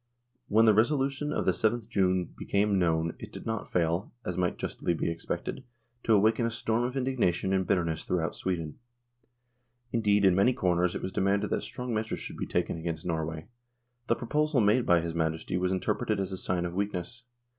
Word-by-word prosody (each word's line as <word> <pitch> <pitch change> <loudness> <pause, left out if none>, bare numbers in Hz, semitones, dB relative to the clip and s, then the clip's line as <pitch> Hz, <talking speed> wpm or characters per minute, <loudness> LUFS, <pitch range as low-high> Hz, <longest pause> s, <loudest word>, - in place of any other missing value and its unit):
When 110 +2 +5
the 110 - +6
resolution 135 +5 +1
of - - -1
the - - +4
7th 110 0 0
June 95 -2 +1
became 100 -1 +1
known, 80 -1 +1
it - - -9
did - - -9
not 110 -1 -3
fail, 85 +2 0
as 90 - -2
might 90 -1 0
justly 85 - -2
be 85 - -1
expected, 85 +9 -4 0.4
to 110 - +4
awaken 110 +3 +3
a 115 - +1
storm 115 0 0
of 125 +2 -3
indignation 115 -9 +1
and 95 -1 +1
bitterness 85 -3 0
through 90 -2 0
out 80 - -2
Sweden. 85 -5 -3 1.1
Indeed 105 -3 +3
in 95 - +6
many 100 +7 +4
quarters 90 -3 +1
it - - -4
was 95 - -3
demanded 100 +2 +1
that - - +1
strong 125 -1 -5
measures 110 0 -1
should - - -7
be - - -3
taken - - -1
against 80 -1 -4
Norway. 80 -2 -2 0.6
The 115 - +3
proposal 150 +4 +1
made 110 +3 +3
by 85 -1 +5
his 85 0 -4
Majesty 80 +1 -1
was 90 0 +1
interpreted 105 +3 0
as 95 -1 -2
a 95 - -4
sign 90 -1 -1
of 85 - -4
weakness. 100 +5 -3
95 Hz, 195 wpm, -29 LUFS, 85-115 Hz, 1.1 s, the